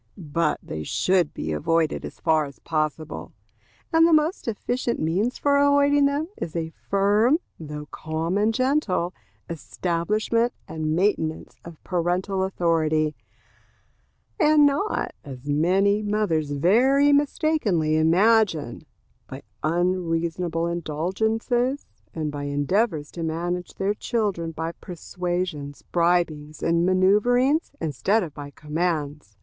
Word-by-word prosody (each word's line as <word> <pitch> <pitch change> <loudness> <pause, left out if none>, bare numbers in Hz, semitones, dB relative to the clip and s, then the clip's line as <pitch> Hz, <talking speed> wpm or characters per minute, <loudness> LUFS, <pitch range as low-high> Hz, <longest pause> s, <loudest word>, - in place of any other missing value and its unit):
But 165 -2 -1
they 80 - -6
should 180 - +1
be 80 - -5
avoided 160 - 0
as - - -10
far 155 -1 +2
as 140 -1 -11
possible; 155 -1 -3 0.6
and 325 0 +6
the - - +2
most 310 +2 +1
efficient 240 +2 -2
means 190 +10 0
for 285 -1 +2
avoiding 285 0 +4
them 285 +3 -1
is 160 - -5
a 160 -1 -2
firm, 205 - +2 0.2
though 150 -2 -7
calm 160 +4 -3
and 210 +2 +2
gentle, 240 - 0 0.3
establishment 205 +8 -1
and 155 -1 -2
maintenance 170 -4 -1
of 170 -2 -12
parental 180 +2 -1
authority, 160 -4 +1 1.2
and 305 -2 +5
not, 285 +9 0
as 135 -1 -10
many 190 +8 +2
mothers 205 -8 0
very 250 - +4
mistakingly 280 - +1
imagine, 170 - +2 0.4
by 135 +2 -8 0.2
unreasonable 170 0 0
indulgences, 220 - -1 0.3
and 155 -2 -3
by 145 -1 -5
endeavors 145 - 0
to 170 - -7
manage 175 +2 -3
their 195 +2 0
children 205 -7 -2
by 165 +1 -4
persuasions, 175 -4 -5
bribings, 170 -3 0
and 170 +1 +2
manoeuvrings, 245 - +3
instead 170 - 0
of 160 -5 -7
by 145 -1 -8
commands. 150 - -3
175 Hz, 115 wpm, -24 LUFS, 155-220 Hz, 1.2 s, and